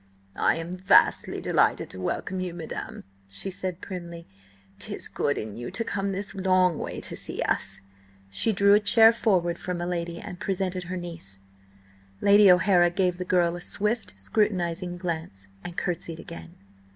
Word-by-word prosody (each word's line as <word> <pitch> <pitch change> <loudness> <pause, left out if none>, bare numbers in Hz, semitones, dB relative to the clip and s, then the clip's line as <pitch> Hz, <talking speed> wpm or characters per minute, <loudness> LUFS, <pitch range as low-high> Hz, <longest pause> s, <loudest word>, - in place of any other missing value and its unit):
"I - - +3
am 165 +2 -5
vastly 190 +2 +3
delighted - - +1
to 95 - -6
welcome 190 - -3
you, 180 -2 -4
madam," 165 -2 -7 0.2
she 100 - -4
said 185 -1 -5
primly. 170 -3 -7 0.5
"'Tis - - -4
good - - -1
in 105 -1 -5
you 120 +1 -6
to 230 - -2
come 200 -2 -2
this 195 +1 -4
long 185 -3 +2
way - - -5
to - - -4
see - - -1
us." - - -1 0.5
She 220 - +3
drew 200 0 +4
a 205 - +6
chair 225 +2 +7
forward 180 -7 +1
for 180 - -4
my 175 0 -3
lady, 170 -1 -3
and 180 -2 -8
presented 185 -2 -2
her 185 +1 -4
niece. 165 - -7 0.8
Lady 200 -1 +7
O'Hara 180 -1 +5
gave 180 0 0
the 180 - -3
girl 175 -2 +2
a 175 - -7
swift, 210 - -2
scrutinising 175 - -1
glance, 160 - -5
and 175 - -8
curtsied 170 -2 -3
again. 170 +1 -10
180 Hz, 165 wpm, -26 LUFS, 170-195 Hz, 0.8 s, chair